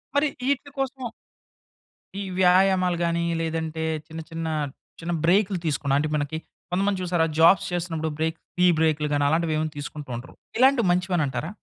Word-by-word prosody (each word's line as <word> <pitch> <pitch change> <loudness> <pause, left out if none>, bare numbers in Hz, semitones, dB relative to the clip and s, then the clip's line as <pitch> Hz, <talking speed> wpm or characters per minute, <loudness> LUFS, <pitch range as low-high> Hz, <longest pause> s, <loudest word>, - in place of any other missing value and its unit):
మరి 285 +1 +4 0.2
ఈటిల 280 +1 0
కోసం 270 0 -2 1.2
ఈ - - -2 0.2
వ్యాయామాలు 185 -1 +4
గాని 170 0 0 0.2
లేదంటే 160 0 -2 0.2
చిన్న 160 -1 -7
చిన్న 165 0 -4 0.5
చిన్న 170 +1 -3
బ్రేకులు 190 +1 +3
తీసుకున్న 140 -2 +1
అంటే 155 +1 -1
మనకి 150 +1 -2 0.3
కొంతమంది 195 +1 +1
చూసారా? 175 -2 +2
జాబ్స్ 170 +2 +6
చేస్తున్నప్పుడు 165 -2 -2
బ్రేక్ 160 +1 0 0.2
టీ 180 - +4
బ్రేకులు 155 -1 +2
గాని 145 0 +2
అలాంటివేవైనా 155 0 +1
తీసుకుంటూ 145 0 -7
ఉంటరు. 120 +2 -8 0.2
ఇలాంటివి 260 -3 +5
మంచివనంటారా? 170 -7 0
165 Hz, 140 wpm, -25 LUFS, 155-185 Hz, 1.2 s, జాబ్స్